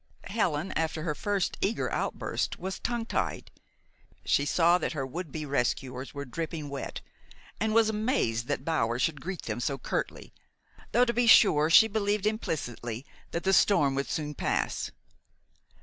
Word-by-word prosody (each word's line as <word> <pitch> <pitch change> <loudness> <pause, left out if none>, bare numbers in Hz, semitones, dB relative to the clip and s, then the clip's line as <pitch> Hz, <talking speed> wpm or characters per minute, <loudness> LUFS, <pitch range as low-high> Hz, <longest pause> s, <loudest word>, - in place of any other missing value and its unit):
Helen, 185 -5 0
after 160 -1 -1
her 160 -3 -1
first 200 +3 -1
eager 215 +4 0
outburst, - - -2
was 190 +1 -5
tongue 235 -2 -2
tied. - - -2 0.7
She 140 - +2
saw 170 +3 +4
that - - -2
her 140 -3 -2
would 160 +4 -6
be 155 +1 -4
rescuers 130 -1 -2
were 140 0 -6
dripping 155 +2 -5
wet, 140 - -5 0.6
and 220 +1 +1
was 225 0 +5
amazed 210 - 0
that 130 - -2
Bower 120 -8 +1
should 135 +3 0
greet 185 -1 -5
them 110 0 -3
so 135 +3 -1
curtly, - - -4 0.6
though, 245 +3 +5
to 235 - 0
be 240 0 +2
sure, 155 -9 +7
she 220 +7 +8
believed 210 -1 0
implicitly 125 - -3 0.2
that 170 - -3
the 190 - +2
storm 150 -9 +4
would 140 +1 -2
soon 150 -1 -2
pass. - - -1
160 Hz, 160 wpm, -29 LUFS, 140-205 Hz, 0.7 s, she